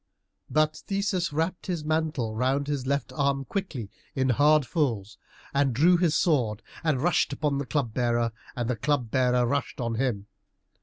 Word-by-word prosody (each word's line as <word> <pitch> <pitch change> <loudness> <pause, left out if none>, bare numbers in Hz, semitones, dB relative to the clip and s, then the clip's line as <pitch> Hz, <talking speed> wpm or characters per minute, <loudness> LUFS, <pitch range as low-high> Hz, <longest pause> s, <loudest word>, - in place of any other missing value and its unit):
But 155 0 +2
Theseus 195 -3 0
wrapped 165 +4 -2
his 170 -5 -2
mantle 155 -8 0
round 130 +4 +1
his 140 -3 -3
left 140 +1 -1
arm 140 -2 0
quickly, 140 - -4 0.2
in 130 0 +1
hard 145 +3 +4
folds, 115 - -1 0.3
and 140 -3 +2
drew 170 +7 +5
his 170 -3 +2
sword, 125 - +1 0.2
and 155 -5 +1
rushed 175 -4 +2
upon 140 -1 0
the 140 - -4
Club 130 -7 -1
bearer, 120 -1 +1 0.2
and 120 -2 -2
the 125 - 0
Club 125 -1 -1
bearer 125 -1 +3
rushed 135 +1 -2
on 115 -2 -1
him. 110 -7 -1
140 Hz, 165 wpm, -27 LUFS, 120-155 Hz, 0.3 s, drew